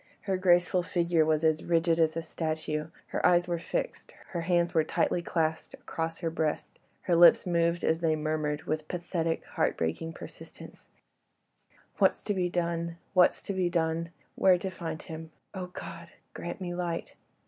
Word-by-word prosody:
Her 195 -1 -1
graceful 180 0 +3
figure 170 -2 +2
was 155 0 +1
as 160 -1 +2
rigid 165 0 +2
as 160 0 +2
a 165 - -2
statue, 155 -1 -3 0.2
her - - -2
eyes 175 0 +4
were 170 -1 -1
fixed, - - -4 0.2
her 175 - -3
hands 175 0 +1
were 160 - +4
tightly 175 +2 0
clasped 160 -2 -1
across 165 0 -4
her 165 -2 -1
breast; 160 -2 -2 0.2
her 175 - +1
lips 170 0 +7
moved 170 -1 +1
as 160 0 +2
they 165 -2 +2
murmured 155 -1 -1
with 155 0 -3
pathetic 170 -2 -2
heart - - 0
breaking 85 - -2
persistence,— - - -11 1.1
"What's - - +3
to 205 - 0
be 180 -2 0
done? 170 -1 -2 0.2
What's 180 -2 +4
to 200 - -3
be 185 -2 +1
done? 165 0 0 0.2
Where 185 -2 +5
to 190 +2 -4
find 165 -4 -5
him?—Oh, 160 +3 -8
God! 170 -1 -8 0.3
grant 175 +4 -6
me 175 -1 -3
light." 175 -1 -3
170 Hz, 165 wpm, -29 LUFS, 160-175 Hz, 1.1 s, lips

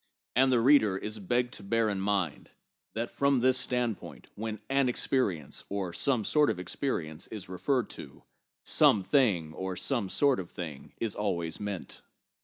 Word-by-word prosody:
And 130 +2 +5
the 125 - +4
reader 115 -6 +5
is 105 +2 -5
begged 120 +5 0
to - - -7
bear 115 +2 +1
in 100 -2 -1
mind 95 -6 -1 0.5
that 115 +2 -2
from 140 -2 +2
this 130 +1 +4
standpoint, 125 -3 -2
when 110 0 -5
'an 135 -1 +2
experience' 100 - -1
or 95 -3 -3
'some 115 +4 +1
sort 150 +5 +4
of - - -1
experience' 85 - -3
is 105 -4 -7
referred 100 +8 0
to, - - -10 0.4
'some 135 -11 +4
thing' 95 - +2
or 95 +1 -4
'some 110 0 0
sort 140 +2 +3
of 90 -2 -6
thing' 80 -6 -8
is 115 -3 -1
always 85 -6 -2
meant. 100 -3 -5
105 Hz, 165 wpm, -29 LUFS, 95-130 Hz, 0.5 s, And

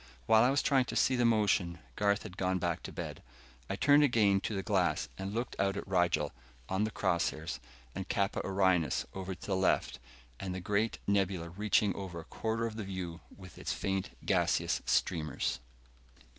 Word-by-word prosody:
While 110 - +6
I 125 - +5
was 140 +1 +2
trying 135 -3 +3
to - - -5
see 130 - +3
the 120 -1 +2
motion, 105 -6 +2 0.2
Garth 100 0 +2
had 95 -4 -9
gone 95 -1 0
back 85 -2 -1
to - - -7
bed. - - -6 0.5
I - - -1
turned 145 +7 +5
again 110 -8 +4
to 105 - -3
the 95 - -2
glass 90 -8 +1
and 95 +1 -5
looked 120 +4 -3
out 100 0 +1
at - - -5
Rigel, 90 -5 +2 0.4
on 95 +3 +1
the - - -2
cross - - +1
hairs, 75 -6 -6 0.3
and 95 0 -5
Kappa 100 -3 0
Orionis, 95 -4 +2
over 95 0 -4
to - - -11
the 100 - 0
left, 95 -8 +1 0.4
and 95 -1 -4
the - - -3
great 105 +4 0
nebula 95 -4 +1
reaching 100 +2 +2
over 95 -4 -6
a - - -8
quarter 115 +1 -2
of 110 -1 -4
the 110 - -3
view 95 -3 -5 0.2
with 90 -4 -12
its - - -2
faint 95 -6 -2 0.2
gaseous - - +2
streamers. 75 -6 0
95 Hz, 190 wpm, -32 LUFS, 90-105 Hz, 0.5 s, While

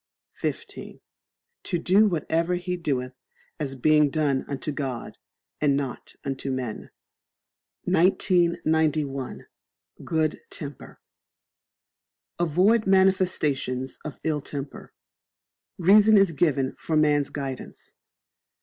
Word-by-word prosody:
xv. - - -5 0.6
To 175 - -1
do 195 +5 +4
whatever 170 0 0
he 180 0 -3
doeth 130 -7 -2 0.5
as 135 -3 -3
being 150 +2 +4
done 140 -3 0
unto 140 +2 -3
God, 135 -5 -5 0.4
and 140 -2 +3
not 135 -3 -5
unto 135 0 -3
men. 130 -4 -4 0.9
1991. 160 -6 +1 0.6
Good 155 -1 -1
Temper. 145 -3 -9 1.4
Avoid 185 +7 +3
Manifestations 180 -9 +1
of 155 - -7
Ill 155 -2 0
temper. 140 0 -7 0.9
Reason 210 +4 +6
is 195 -3 +4
given 140 -4 0
for 160 - -1
man's 145 -2 +3
guidance. 135 -3 -7
155 Hz, 95 wpm, -25 LUFS, 135-175 Hz, 1.4 s, Reason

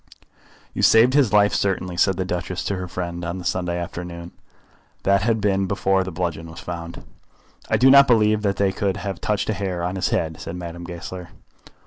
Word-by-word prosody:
"You - - -3
saved 115 +3 +6
his 140 -6 +3
life, 105 -1 +4
certainly," 90 -2 -1
said 95 +1 +2
the 95 - -1
Duchess 90 +1 -3
to 100 - -2
her 90 0 -5
friend 85 0 -5
on 85 +2 -3
the 90 - -8
Sunday 90 0 -1
afternoon. 85 0 -6 0.7
That 100 +1 +3
had 110 +1 +1
been 95 -2 +1
before 95 0 +1
the 95 - -6
bludgeon 85 -1 -3
was 80 - -10
found. 85 -1 -7 0.7
"I - - +3
do 130 +1 +6
not 140 0 +8
believe 110 -3 +3
that 100 -2 0
they 100 -1 +1
could 95 0 -1
have 100 -1 -5
touched 105 +1 -1
a - - 0
hair 95 -4 -3
of 90 +2 -2
his 95 - 0
head," 80 -1 -1
said 85 - -6
Madame 85 0 -7
Goesler. 90 0 -8
95 Hz, 200 wpm, -22 LUFS, 85-100 Hz, 0.7 s, not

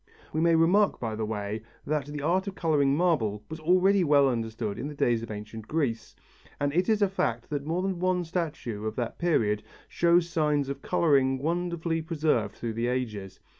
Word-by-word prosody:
We 155 - 0
may 165 0 +4
remark 185 +6 +3
by 110 -2 -3
the 110 0 -3
way 105 0 -3 0.2
that 150 -1 -1
the 145 -1 -6
art 185 +5 +1
of 195 - -4
colouring 145 -4 +2
marble 115 - +1
was 160 - -5
already 185 +4 +4
well 145 -3 +5
understood 115 -3 -2
in 140 - -3
the 150 - -7
days 120 -4 +1
of 115 - -7
ancient 105 +1 -7
Greece, 125 -8 -2 0.4
and 145 0 0
it 180 +5 +1
is 215 -2 +3
a - - +4
fact 120 -10 -2
that 145 0 -3
more 175 +3 0
than 190 -2 -2
one 180 0 +1
statue 155 - -3
of 110 - -4
that 120 -2 -4
period 110 -12 +1 0.3
shows 170 0 +3
signs 150 -4 0
of 140 0 -5
colouring 135 -5 +2
wonderfully 170 +2 -1
preserved 155 - 0
through 115 -2 -4
the 115 +2 -1
ages. 105 -7 -3
145 Hz, 195 wpm, -28 LUFS, 115-170 Hz, 0.4 s, well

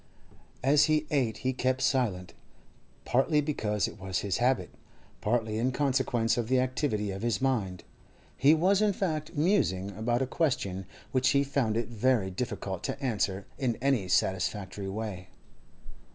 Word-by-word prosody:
As 145 +2 +5
he 155 -1 +2
ate 130 -7 +1
he 130 - +2
kept 130 +1 0
silence, 95 -10 0 0.7
partly 135 +5 +2
because 110 -9 0
it 105 - -10
was 95 -1 -2
his 100 -2 -1
habit, 125 +1 +1 0.5
partly 110 -1 0
in 125 +3 +1
consequence 130 -4 +1
of 120 -2 -1
the 130 +1 +3
activity 125 -5 -1
of 95 +1 -6
his 120 -1 0
mind. 110 -9 -1 0.5
He 145 +4 +5
was, 190 +5 +3
in 210 -1 +3
fact, 155 -6 -2
musing 145 - +1
upon 120 +5 0
a - - 0
question 100 - -1 0.2
which 130 0 +3
he 140 0 +3
found 135 -6 0
it 115 - -1
very 115 -4 +1
difficult 95 -2 -4
to - - -3
answer 100 -7 -1
in 125 -4 0
any 130 -7 +1
satisfactory 95 +2 -1
way. 100 -3 -5
120 Hz, 150 wpm, -29 LUFS, 100-135 Hz, 0.7 s, As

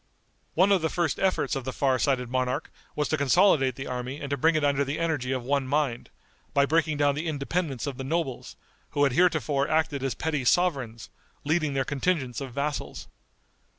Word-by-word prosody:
One 185 +4 +4
of 195 -3 +4
the 160 - 0
first 170 -5 -1
efforts 190 -4 +1
of 135 - -3
the 130 - -4
far 130 0 +1
sighted 130 -3 +1
monarch 130 0 -2 0.2
was 150 -1 0
to 155 - +1
consolidate 140 -2 +4
the 135 - -6
army 125 +2 -4
and 140 0 -6
to - - +2
bring 160 +5 +3
it 155 - +1
under 140 0 +2
the 140 +2 -3
energy 155 -6 -1
of 130 -2 -2
one 140 +1 0
mind, 140 -4 -1 0.5
by 140 0 +5
breaking 155 0 +1
down 145 -1 +3
the 155 +4 -4
independence 145 -3 -2
of 140 -3 -4
the 135 - -5
nobles, 145 -2 -3 0.4
who 145 - +4
had 140 - +3
heretofore 150 -4 +2
acted 155 -3 +1
as 135 -4 -2
petty 150 0 -2
sovereigns, 130 - 0 0.3
leading 155 -2 0
their 135 -1 +1
contingents 145 -2 -1
of 135 -2 -6
vassals. 140 +3 -4
140 Hz, 195 wpm, -27 LUFS, 130-160 Hz, 0.5 s, by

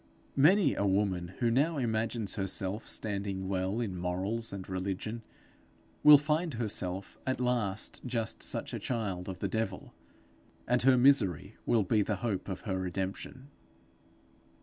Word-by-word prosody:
Many 180 +9 +5
a - - -1
woman 95 -3 0
who 120 -1 +3
now 145 +6 +2
imagines 115 -3 -1
herself 95 +1 -2
standing 100 -2 -2
well 95 +3 -1
in 105 -6 -2
morals 95 +6 -1
and 95 -2 -7
religion, 95 +4 -3 0.8
will 150 0 +10
find 150 +1 -1
herself 100 -4 -2
at 130 - 0
last 120 -5 -1
just 115 -3 -2
such - - -4
a - - -3
child 100 -7 -3
of 95 - -5
the 100 - -2
devil; 110 +4 -3 0.7
and 125 0 +3
her 130 0 +5
misery 110 -7 +3
will 115 -3 +3
be 105 +3 +2
the 105 +1 0
hope 100 -4 -2
of 95 - -4
her 95 -4 -2
redemption. 95 +8 -4
105 Hz, 145 wpm, -31 LUFS, 95-120 Hz, 0.8 s, will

